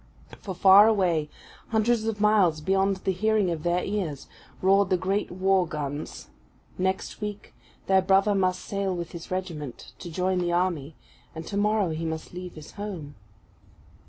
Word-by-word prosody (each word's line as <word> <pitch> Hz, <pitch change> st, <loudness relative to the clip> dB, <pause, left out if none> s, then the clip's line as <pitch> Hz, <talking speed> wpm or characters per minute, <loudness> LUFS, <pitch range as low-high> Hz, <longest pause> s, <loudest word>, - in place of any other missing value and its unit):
For, 190 Hz, -3 st, -6 dB
far 195 Hz, +3 st, +8 dB
away, 175 Hz, -8 st, +1 dB, 0.4 s
hundreds 225 Hz, 0 st, +1 dB
of 220 Hz, -2 st, -2 dB
miles 205 Hz, -7 st, +3 dB
beyond 195 Hz, +4 st, +1 dB
the 190 Hz, -, +2 dB
hearing 210 Hz, 0 st, +1 dB
of 165 Hz, -2 st, -3 dB
their 175 Hz, +2 st, 0 dB
ears, 185 Hz, -9 st, -3 dB, 0.3 s
roared 195 Hz, 0 st, +3 dB
the 185 Hz, -, +3 dB
great 195 Hz, +3 st, -1 dB
war 185 Hz, 0 st, +2 dB
guns; 145 Hz, -1 st, -5 dB, 0.5 s
next 190 Hz, +3 st, -2 dB
week 210 Hz, -1 st, -6 dB, 0.3 s
their 190 Hz, 0 st, +4 dB
brother 195 Hz, +2 st, +3 dB
must 185 Hz, -2 st, 0 dB
sail 195 Hz, -2 st, -2 dB
with 170 Hz, -1 st, -5 dB
his 170 Hz, -1 st, -9 dB
regiment 165 Hz, -8 st, -5 dB
to 175 Hz, -, -7 dB
join 180 Hz, +2 st, 0 dB
the 175 Hz, -1 st, 0 dB
army; 170 Hz, -5 st, -1 dB, 0.4 s
and 160 Hz, 0 st, -6 dB
tomorrow 205 Hz, -2 st, +1 dB
he 160 Hz, +1 st, -4 dB
must 160 Hz, +1 st, -5 dB
leave 180 Hz, 0 st, -7 dB
his 155 Hz, -1 st, -11 dB
home. 185 Hz, -8 st, -7 dB
185 Hz, 160 wpm, -26 LUFS, 170-200 Hz, 0.5 s, far